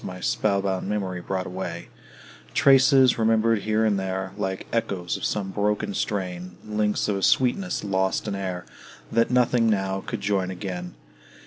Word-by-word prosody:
My 90 0 -6
spell 100 +1 +1
bound 95 0 -2
memory 95 -4 -2
brought 95 +1 -3
away; 90 -2 -6 0.7
Traces, 135 -2 +5
remembered 115 0 +3
here 110 +2 +1
and 105 -2 +2
there, 95 0 -3
Like 95 -2 -3
echoes 95 -6 -1
of - - -7
some 100 -2 -1
broken 105 0 -1
strain; 90 -3 -3
Links 105 -1 0
of 100 -2 0
a - - -4
sweetness 130 - +2
lost 95 0 0
in 105 - -2
air, 95 -2 -4 0.5
That 115 +1 +2
nothing 125 -2 +3
now 95 -2 0
could 115 -4 -4
join 100 -2 0
again. 90 -3 -5
100 Hz, 155 wpm, -25 LUFS, 95-110 Hz, 0.7 s, Traces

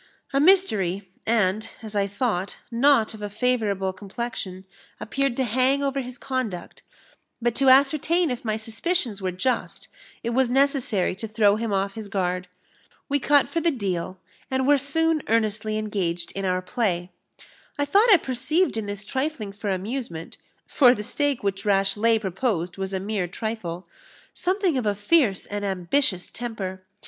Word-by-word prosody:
A 275 - +3
mystery, 210 - +3 0.2
and, 220 -1 +1
as 215 -1 -6
I 200 -1 +2
thought, 200 -3 -2
not 235 -2 +4
of 215 - -10
a 205 - -4
favourable 210 -4 0
complexion, 195 -1 -6 0.3
appeared 275 +1 -1
to 265 - +2
hang 260 +4 +2
over 275 0 0
his 250 0 -8
conduct; 255 -9 -4 0.6
but 240 -1 0
to 270 +2 +3
ascertain 305 +5 +4
if 250 +2 -4
my 215 -2 -1
suspicions 225 - -1
were 185 -1 -1
just, 230 +7 -2 0.3
it 235 - -1
was 255 0 +2
necessary 255 -8 +2
to 225 - -5
throw 210 -1 +3
him 225 0 -2
off 195 0 0
his 220 -1 -7
guard. 180 -2 -2 0.6
We 285 +1 +2
cut 285 0 +4
for 335 - -2
the 340 - +3
deal, 190 - -3 0.3
and 260 0 0
were 290 -1 +5
soon 320 +3 +1
earnestly 215 -1 +1
engaged 185 -6 -2
in 195 0 -4
our 185 0 0
play. 180 -4 -1 0.7
I 285 - +1
thought 410 +10 +4
I 395 - +9
perceived 305 +3 0
in 215 -2 -3
this 205 0 -5
trifling 265 -4 -3
for 205 +1 -5
amusement 190 -3 -4 0.3
(for 250 -3 +5
the 210 - -5
stake 285 +2 -1
which 195 -1 -1
Rashleigh 205 +3 +3
proposed 190 -3 -2
was 190 0 -4
a 190 - -1
mere 200 -2 -2
trifle) 190 -3 -5 0.5
something 365 -5 +1
of 225 - -2
a 205 - +1
fierce 205 - +2
and 205 0 -4
ambitious 190 +1 0
temper. 200 -6 -5
220 Hz, 160 wpm, -24 LUFS, 195-265 Hz, 0.7 s, I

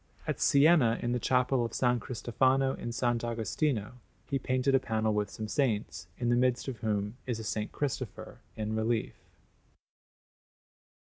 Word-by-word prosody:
At - - -2
Siena, 140 -5 +5
in 120 - 0
the 125 - 0
Chapel 125 0 +2
of 115 - -4
S. - - -3 0.2
Cristofano 130 +3 +1
in - - -7
S. 120 - -4
Agostino, 120 +1 -1 0.3
he 140 -2 -1
painted 130 +1 +1
a 135 - +6
panel 110 -4 0
with 105 -1 0
some 110 +1 -6
saints, 110 - -1
in 120 -1 -1
the 120 - +4
midst 125 +1 +1
of 130 -3 -4
whom 105 0 -2
is 120 -3 -1
a - - -5 0.2
S. 105 - -5
Cristopher 125 -4 -4 0.2
in 110 0 -3
relief. 110 +1 0
120 Hz, 155 wpm, -30 LUFS, 110-130 Hz, 0.3 s, a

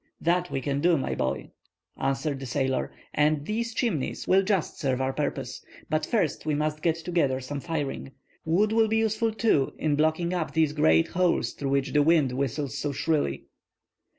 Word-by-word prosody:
"That 175 +1 +1
we 135 - -2
can 140 +2 -1
do, 170 0 +4
my 135 - -2
boy," 65 +1 -2 0.4
answered 135 +1 -1
the 135 - -6
sailor, 130 0 -1 0.2
"and 150 -1 +2
these 230 +4 -2
Chimneys 215 - -1
will 190 +1 +5
just 195 -3 -1
serve 130 -3 0
our 130 0 0
purpose. 135 -4 -3 0.3
But 155 0 0
first 200 -10 0
we 155 -1 0
must 155 +1 -1
get 165 -1 +2
together 165 -6 0
some 135 +2 -5
firing. 145 -4 -4 0.3
Wood 190 +7 +2
will 225 0 +4
be 220 +1 +1
useful, 225 +1 +1
too, 215 -11 +1
in 155 -2 +1
blocking 160 +3 +1
up 175 -3 -2
these 160 -2 +2
great 80 - +3
holes 180 -1 +1
through 140 - -4
which 140 -1 0
the 150 - +5
wind 150 -3 +4
whistles 135 +1 -2
so 145 - -1
shrilly." 145 - -1
150 Hz, 180 wpm, -27 LUFS, 135-175 Hz, 0.4 s, will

